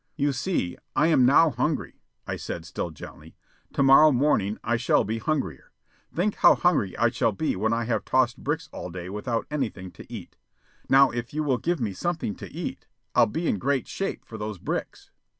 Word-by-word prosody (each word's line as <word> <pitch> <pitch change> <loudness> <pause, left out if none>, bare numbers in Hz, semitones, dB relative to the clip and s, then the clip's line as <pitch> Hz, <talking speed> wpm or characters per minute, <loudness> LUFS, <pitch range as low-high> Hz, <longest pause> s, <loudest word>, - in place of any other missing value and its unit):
"You 145 -1 +1
see, 130 - -2 0.2
I 155 +2 +3
am 130 -6 +5
now 155 +4 +5
hungry," 150 +1 -2 0.2
I - - -3
said 80 - -6
still 85 +1 -4
gently. 80 0 -12 0.4
"To 140 - +2
morrow 135 +3 +7
morning 120 -7 +1
I 120 +1 +1
shall 120 +1 +2
be 110 +3 -3
hungrier. 110 - -3 0.4
Think 195 +5 -1
how - - +7
hungry 150 - +1
I 120 - +3
shall 115 -1 +1
be 155 +10 -1
when 110 +4 0
I 115 0 0
have 115 0 -1
tossed 130 -2 +1
bricks 150 +3 -2
all - - -6
day 90 +1 -7
without 115 +3 -2
anything 110 -11 -3
to - - -14
eat. - - -9 0.5
Now 135 0 +6
if 120 +3 -5
you 155 - 0
will 130 -5 +1
give 175 -1 -1
me 110 -5 -2
something 160 - -2
to - - -9
eat, - - -6 0.3
I'll - - +5
be 165 +11 -3
in 100 - 0
great 135 +1 0
shape 195 - -4
for 110 - -9
those 105 -1 -4
bricks." - - -5
125 Hz, 200 wpm, -26 LUFS, 105-150 Hz, 0.5 s, morrow